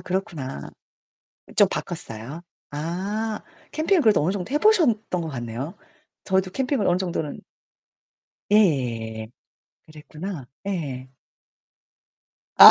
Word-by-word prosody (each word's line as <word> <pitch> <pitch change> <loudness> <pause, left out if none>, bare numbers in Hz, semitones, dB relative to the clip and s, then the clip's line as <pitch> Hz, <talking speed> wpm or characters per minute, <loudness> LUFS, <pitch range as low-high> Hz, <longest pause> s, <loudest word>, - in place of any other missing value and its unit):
그렇구나. 170 - -3 0.9
좀 - - +7
바꿨어요? 115 +9 -5 0.3
아. 195 +8 -2 0.3
캠핑을 320 +5 +3
그래도 215 -8 +5
어느 180 +6 +2
정도 195 +1 -4
해 - - +4
보셨던 260 - +4
것 165 - -3
같네요. 120 +3 -4 0.5
저희도 190 0 +2
캠핑을 265 -4 +1
어느 175 - +4
정도는 175 -5 -2 1.1
예예예예예. 120 - +2 0.6
그랬구나. 155 0 -7 0.2
예. 140 -9 -3 1.5
아. - - +14
175 Hz, 235 characters per minute, -25 LUFS, 135-210 Hz, 1.5 s, 아